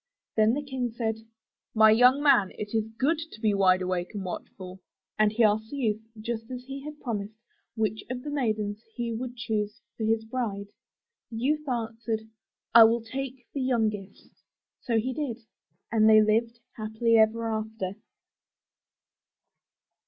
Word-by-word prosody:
Then 220 +2 +4
the 290 - -3
King 260 -3 -2
said, 225 -1 -2 0.6
"My 220 0 +7
young 250 +5 +5
man 255 -10 +5
it 210 0 -6
is 220 -1 0
good 300 +5 +2
to - - -11
be 215 -2 +2
wide 185 -2 +4
awake 180 +1 -2
and 195 -2 -4
watchful," 185 +1 -7 0.4
and 215 -1 +4
he 230 +2 +2
asked 220 +1 +2
the 285 - -6
youth, 220 -5 0 0.2
just 225 +1 -4
as 250 -1 -6
he 270 +1 -7
had 300 0 -8
promised, 215 -3 -4 0.4
which 220 -1 -1
of 250 0 -4
the 295 - -5
maidens 215 -6 -1
he 235 -1 -2
would 245 +2 -5
choose 215 -1 -2 0.2
for 225 - -5
his 220 0 +1
bride. 220 -4 -3 0.6
The 225 - -7
youth 300 +4 0
answered, 225 -2 -2 0.5
'1 225 -1 +10
will 230 0 0
take 260 +1 -6
the 280 - -2
youngest." 215 -6 -2 0.5
So 230 -2 0
he 255 +4 0
did, 250 -5 -4 0.5
and 220 -1 +5
they 215 0 +8
lived 230 +2 +1 0.2
happily 220 +1 +1
ever 225 +1 +3
after. 220 -3 -3
225 Hz, 160 wpm, -27 LUFS, 215-245 Hz, 0.6 s, 1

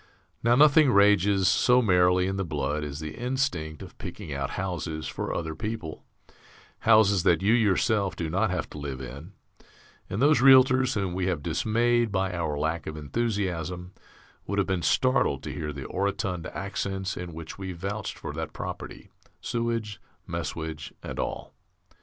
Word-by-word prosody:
Now 120 +1 +4
nothing 150 +1 +6
rages 100 -2 +4
so 125 +6 +4
merrily 90 -4 +4
in 95 +1 -1
the 95 - -1
blood 75 -2 -2
as 75 -1 -5
the 75 0 -5
instinct 120 - -2
of - - -12
picking - - -7
out - - -2
houses 80 -4 -3
for - - -4
other 80 -1 -3
people, 100 -2 -5 0.8
houses 110 -4 +5
that 85 -1 +3
you 105 +3 +4
yourself 105 -2 +2
do 85 - -3
not 95 +7 +1
have 90 -4 -2
to 75 - -8
live 70 -3 -5
in; 70 +8 -9 0.8
and 100 - -3
those 145 0 +5
Realtors 130 -1 +6
whom 95 -4 -1
we 90 0 -1
have 85 -6 -1
dismayed 120 +3 +1
by 95 -1 0
our 80 -4 -2
lack 80 +3 -2
of 80 0 -5
enthusiasm 90 0 -2 0.5
would 100 - -2
have 100 - +3
been 95 -3 -1
startled 130 - +2
to - - -5
hear 75 -1 -4
the 70 -2 -7
orotund 100 -3 -2
accents 95 0 -3
in 90 -1 -6
which 80 +3 -9
we 95 -1 -4
vouched 95 +4 -5
for - - -6
that - - -5
property, - - -7 0.3
sewage, 115 -4 -3 0.3
messuage, 80 -3 -5
and - - -6
all. - - -4
95 Hz, 165 wpm, -27 LUFS, 80-110 Hz, 0.8 s, nothing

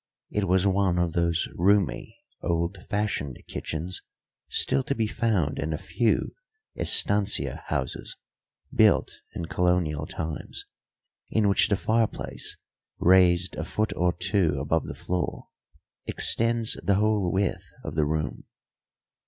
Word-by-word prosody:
It 105 -2 0
was 95 +1 +3
one 95 -2 +2
of 85 -2 0
those 85 -1 +1
roomy, 100 0 +1 0.2
old 85 +2 -2
fashioned 105 - -2
kitchens 85 +4 -5 0.5
still - - +3
to 140 - -1
be 115 - +1
found 105 - 0
in 80 +2 -2
a - - -1
few 115 +7 0 0.4
estancia 100 -1 +1
houses - - -3 0.6
built - - +3 0.2
in 85 - -3
colonial 85 -4 0
times, 80 -1 -6 0.6
in 110 -2 +2
which 100 - +4
the 100 - +3
fireplace, 110 +2 -1 0.4
raised 90 0 +4
a - - -2
foot 110 +6 -1
or 90 0 +2
two 90 -4 +1
above 80 +4 0
the - - -6
floor, 90 0 -3 0.6
extends 115 0 +3
the 100 +3 +3
whole 105 -3 +2
width 95 0 -1
of - - -5
the 75 -1 +1
room. 75 -2 -3
90 Hz, 130 wpm, -26 LUFS, 85-105 Hz, 0.6 s, which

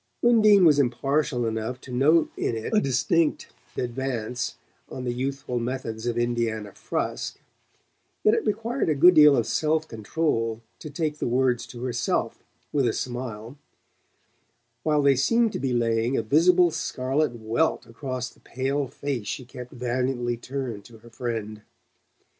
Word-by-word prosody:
Undine 215 -5 +6
was 150 -3 +6
impartial 130 0 +1
enough 110 +3 -3
to 130 - -12
note 150 +6 +3
in 115 - -1
it 110 - -4
a 215 - +4
distinct 150 +5 +1 0.3
advance 125 -1 -3 0.3
on 130 - -6
the 120 -1 -1
youthful 135 0 -3
methods 120 -2 -4
of 120 -1 -1
Indiana 115 -3 -1
Frusk; - - -4 0.8
yet 215 - +5
it - - +1
required 230 +1 -1
a 155 - +2
good 175 +6 +7
deal 150 -3 +7
of 115 - +1
self 155 0 0
control 115 -1 -1 0.2
to 155 - -8
take 150 0 -3
the - - -1
words 125 0 +1
to 120 0 -9
herself 120 -2 -1 0.3
with 140 -4 +2
a 115 - +1
smile, 120 0 -5 1.2
while 150 +2 +2
they 140 -1 +5
seemed 230 - +2
to - - -3
be 130 -1 -1
laying 115 +1 +1
a - - 0
visible 175 +8 +4
scarlet 135 0 -1
welt 115 +9 0
across 125 +2 -5
the - - -24
pale 135 +2 -2
face 130 -5 -4
she 130 - -4
kept 125 0 -10
valiantly 125 0 -1
turned 120 -3 -5
to 115 +1 -14
her 115 +2 -17
friend. 110 -3 -4
125 Hz, 155 wpm, -25 LUFS, 120-150 Hz, 1.2 s, good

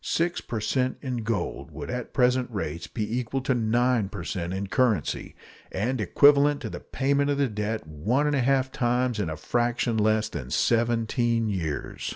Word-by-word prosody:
Six 170 +1 0
per 115 - -4
cent 130 +4 0
in 130 -3 -2
gold 115 -1 -3
would - - -7
at 125 -1 -4
present 125 -1 +2
rates 85 -6 -4
be 110 +2 -2
equal 125 +2 -3
to 130 0 +1
9 120 -2 +1
per 100 -5 -6
cent 85 -1 -3
in 95 +1 -2
currency, 110 - 0 0.4
and 115 +5 -1
equivalent 145 +7 +5
to - - -5
the - - -6
payment 140 +1 0
of 145 - +1
the 140 -1 +2
debt 105 -2 -3
one 100 - 0
and 150 -1 +1
a 135 - +2
half 130 +1 +2
times 125 -1 0
in 95 -6 -1
a 80 - -4
fraction 120 +4 0
less 110 0 +2
than 65 - -6
seventeen 115 - +1
years. 85 -7 -3
120 Hz, 185 wpm, -26 LUFS, 105-130 Hz, 0.4 s, equivalent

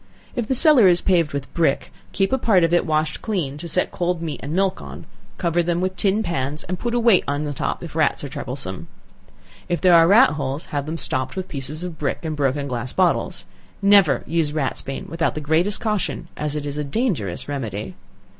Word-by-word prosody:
If 240 -3 -2
the 265 - +1
cellar 265 - +6
is 175 -1 +5
paved 170 -5 +2
with 140 -1 -5
brick, 160 -5 0 0.2
keep 195 +5 0
a 265 - +2
part 195 -7 +3
of 165 +1 +2
it 175 - +2
washed 155 0 0
clean, 160 -10 -2
to 170 - -6
set 175 +3 0
cold 175 -1 -1
meat 160 -3 -4
and 140 - -6
milk 190 +2 0
on; - - -9 0.3
cover 175 -1 +1
them 170 0 0
with 185 +1 -1
tin 205 +3 +1
pans 150 -4 -2
and 180 +1 -4
put 240 0 -2
a - - +2
weight 230 -5 +4
on 145 +1 -1
the 145 -1 -3
top - - -3
if - - -9
rats - - +1
are - - -5
troublesome. - - -5 0.8
If 175 - 0
there 185 -2 +5
are 165 -1 +7
rat 230 +8 +6
holes 140 0 -3
have 145 0 -2
them 160 +2 -3
stopped 130 -1 0
with 190 -1 -4
pieces 145 +3 -5
of 175 -3 -6
brick, 150 +3 -2
and 155 -1 -2
broken 140 0 0
glass 125 -1 -4
bottles; 185 -2 0 0.3
never 200 -5 +5
use 160 -2 0
ratsbane 135 -2 -3
without 165 0 -1
the - - -2
greatest 160 +7 +1
caution, 210 -5 -2
as 150 0 -3
it 150 -1 -3
is 145 0 -4
a - - -1
dangerous 140 - -2
remedy. 110 -9 -4
165 Hz, 215 wpm, -22 LUFS, 145-185 Hz, 0.8 s, are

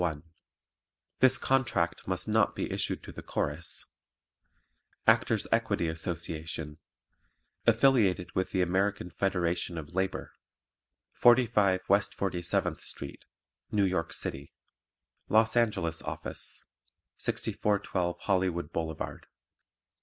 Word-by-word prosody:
1 80 -4 -1 1.0
THIS 130 0 +6
CONTRACT 120 -11 0
MUST 95 +2 -1
NOT 110 -1 +2
BE - - -3
ISSUED - - -2
TO - - -9
THE - - -8
CHORUS - - -3 1.2
Actors' - - +4
Equity 85 - +1
Association 80 -2 -4 0.9
(Affiliated 115 -7 +4
with 95 - 0
the 95 -2 +1
American 95 0 0
Federation 90 -3 0
of 80 +1 -7
Labor) 95 +1 -2 0.8
45 105 -6 +4
West 100 +1 +2
47th 90 -3 0
Street, 70 - -6 0.5
New 100 -2 +3
York 85 -3 -1
City 70 +1 -4 0.8
LOS 110 +1 +4
ANGELES 95 -9 +1
OFFICE - - -5 0.5
6412 90 -4 0
Hollywood 90 -4 0
Blvd. 80 -2 -4
95 Hz, 100 wpm, -30 LUFS, 85-105 Hz, 1.2 s, THIS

